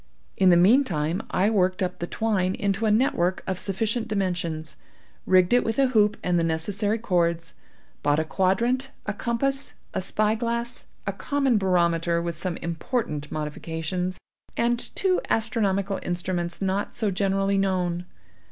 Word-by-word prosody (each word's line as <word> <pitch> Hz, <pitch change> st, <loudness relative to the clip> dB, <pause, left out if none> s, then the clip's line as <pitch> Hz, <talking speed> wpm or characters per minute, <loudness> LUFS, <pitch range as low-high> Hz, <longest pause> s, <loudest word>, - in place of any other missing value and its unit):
In 190 Hz, -, +4 dB
the 175 Hz, -, +6 dB
meantime 180 Hz, -, +3 dB
I 200 Hz, +4 st, +2 dB
worked 185 Hz, -2 st, +2 dB
up 180 Hz, 0 st, -3 dB
the 175 Hz, -, -3 dB
twine 195 Hz, -4 st, 0 dB
into 200 Hz, +2 st, 0 dB
a -, -, +3 dB
net 225 Hz, +6 st, +3 dB
work 180 Hz, +2 st, 0 dB
of 185 Hz, -1 st, -2 dB
sufficient 220 Hz, +5 st, -1 dB
dimensions; 175 Hz, -6 st, -2 dB, 0.5 s
rigged 185 Hz, +2 st, +4 dB
it 245 Hz, -, +5 dB
with 225 Hz, -, -2 dB
a 270 Hz, -1 st, +4 dB
hoop 210 Hz, -3 st, +3 dB
and 175 Hz, -1 st, +2 dB
the -, -, +1 dB
necessary 200 Hz, +7 st, 0 dB
cords; 170 Hz, -6 st, 0 dB, 0.5 s
bought 145 Hz, 0 st, +2 dB
a 160 Hz, -, +2 dB
quadrant, 235 Hz, -, +1 dB, 0.2 s
a 205 Hz, -, -2 dB
compass, 270 Hz, +6 st, -1 dB, 0.2 s
a -, -, -1 dB
spy 210 Hz, +3 st, +2 dB
glass, 235 Hz, +1 st, -2 dB, 0.2 s
a -, -, -1 dB
common 275 Hz, -6 st, +1 dB
barometer 170 Hz, -3 st, +2 dB
with 170 Hz, -1 st, -3 dB
some 170 Hz, +1 st, -3 dB
important 165 Hz, -, -3 dB
modifications, 160 Hz, +4 st, -3 dB, 0.4 s
and 240 Hz, 0 st, 0 dB
two 380 Hz, -2 st, +2 dB
astronomical 200 Hz, -3 st, +1 dB
instruments 175 Hz, 0 st, -3 dB
not 195 Hz, +1 st, -1 dB
so 215 Hz, -4 st, 0 dB
generally 195 Hz, +1 st, +1 dB
known. 180 Hz, -2 st, -1 dB
190 Hz, 150 wpm, -25 LUFS, 175-220 Hz, 0.5 s, the